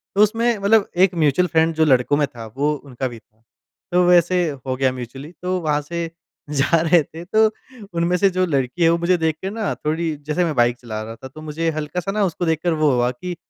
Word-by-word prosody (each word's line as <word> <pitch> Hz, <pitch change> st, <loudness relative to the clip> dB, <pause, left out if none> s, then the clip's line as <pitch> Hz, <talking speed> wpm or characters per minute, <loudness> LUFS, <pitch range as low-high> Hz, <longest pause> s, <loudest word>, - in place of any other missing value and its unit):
तो 200 Hz, -, +4 dB
उसमें 230 Hz, +2 st, +1 dB
मतलब 200 Hz, +1 st, +3 dB
एक 190 Hz, 0 st, +4 dB
म्यूचुअल 165 Hz, +2 st, +2 dB
फ्रेंड 160 Hz, 0 st, +2 dB
जो 160 Hz, 0 st, +3 dB
लड़कों 135 Hz, +1 st, +3 dB
में 150 Hz, -, +2 dB
था, 115 Hz, -3 st, -10 dB
वो 140 Hz, +7 st, -1 dB
उनका 130 Hz, -2 st, -5 dB
भी 120 Hz, -2 st, -9 dB
था। 110 Hz, 0 st, -39 dB, 0.5 s
तो 180 Hz, 0 st, +4 dB
वैसे 175 Hz, -1 st, +4 dB, 0.2 s
हो 130 Hz, -1 st, -1 dB
गया 130 Hz, 0 st, +1 dB
म्यूचुअली 130 Hz, +5 st, -8 dB
तो 185 Hz, 0 st, -1 dB
वहाँ 150 Hz, -2 st, 0 dB
से 170 Hz, +3 st, -4 dB, 0.4 s
जा 150 Hz, +3 st, +2 dB
रहे 170 Hz, 0 st, +4 dB
थे। 165 Hz, +3 st, -10 dB
तो 220 Hz, +4 st, +3 dB, 0.5 s
उनमें 170 Hz, +1 st, +1 dB
से 195 Hz, +1 st, +4 dB
जो 185 Hz, 0 st, 0 dB
लड़की 140 Hz, +1 st, -1 dB
है, 165 Hz, -, +6 dB
वो 170 Hz, -, +3 dB
मुझे 175 Hz, +1 st, +2 dB
देख 160 Hz, -2 st, 0 dB
के 190 Hz, -, -3 dB
ना 215 Hz, 0 st, -2 dB
थोड़ी 160 Hz, +1 st, -2 dB
जैसे 160 Hz, +4 st, +1 dB
मैं 155 Hz, -4 st, -2 dB
बाइक 120 Hz, 0 st, +2 dB
चला 110 Hz, -3 st, -5 dB
रहा 115 Hz, +1 st, -8 dB
था 125 Hz, +4 st, -10 dB
तो 155 Hz, +4 st, -12 dB
मुझे 155 Hz, +2 st, -2 dB
हल्का-सा 155 Hz, +5 st, -3 dB
ना 210 Hz, 0 st, 0 dB
उसको 175 Hz, -1 st, -2 dB
देखकर 160 Hz, +1 st, 0 dB
वो 155 Hz, -2 st, +2 dB
हुआ 125 Hz, 0 st, +1 dB
कि 175 Hz, +8 st, -6 dB
160 Hz, 230 wpm, -21 LUFS, 135-180 Hz, 0.5 s, है